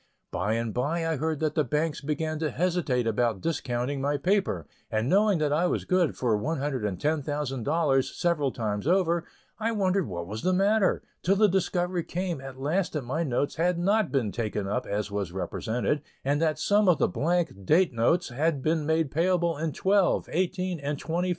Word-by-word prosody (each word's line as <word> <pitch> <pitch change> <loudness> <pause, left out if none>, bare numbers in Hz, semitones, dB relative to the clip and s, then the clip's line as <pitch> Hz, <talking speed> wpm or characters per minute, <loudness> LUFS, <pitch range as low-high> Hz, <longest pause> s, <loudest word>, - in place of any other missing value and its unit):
By 100 +5 -1
and 115 -1 -2
by 160 +7 -1
I 160 -2 0
heard 155 +1 -1
that 155 -1 +1
the 155 - +2
banks 150 +4 -1
began 155 +1 -2
to 155 -1 0
hesitate 165 -9 0
about 115 -2 +1
discounting 135 - -2
my 145 +1 +1
paper, 180 - 0 0.2
and 110 +2 0
knowing 200 +4 +4
that 150 -2 +1
I 170 +4 +2
was - - -1
good 180 -4 +1
for 120 -4 +1
$110,000 140 - 0
several 155 -6 +1
times 105 0 -3
over, 170 -2 +2 0.3
I 225 +1 0
wondered 195 - +1
what 85 -3 -5
was 105 +5 -6
the 185 - +1
matter, 200 +2 +2 0.2
till 190 +3 +2
the 210 +1 +5
discovery 180 -2 0
came 175 -4 -3
at 135 -1 -9
last 170 +7 0
that 150 -4 -2
my 135 +7 -2
notes 140 -2 -1
had 175 +2 +2
not 200 +2 +2
been 125 -7 0
taken 105 -3 -2
up 125 +5 -2
as 105 0 -2
was 100 -4 -2
represented, 115 +9 -2 0.2
and 145 +2 +1
that 155 -2 +1
some 205 -1 +3
of 175 - +5
the - - +2
blank 165 - -1
date 160 - +3
notes 140 +10 +2
had 140 +2 0
been 155 -1 +1
made 160 -3 +1
payable 170 0 +1
in 155 +2 -2
twelve, 195 +3 +2
eighteen, 180 0 -1
and 145 +1 -3
twenty - - -12
four 170 +2 +1
months. 180 - 0
155 Hz, 190 wpm, -27 LUFS, 125-175 Hz, 0.3 s, the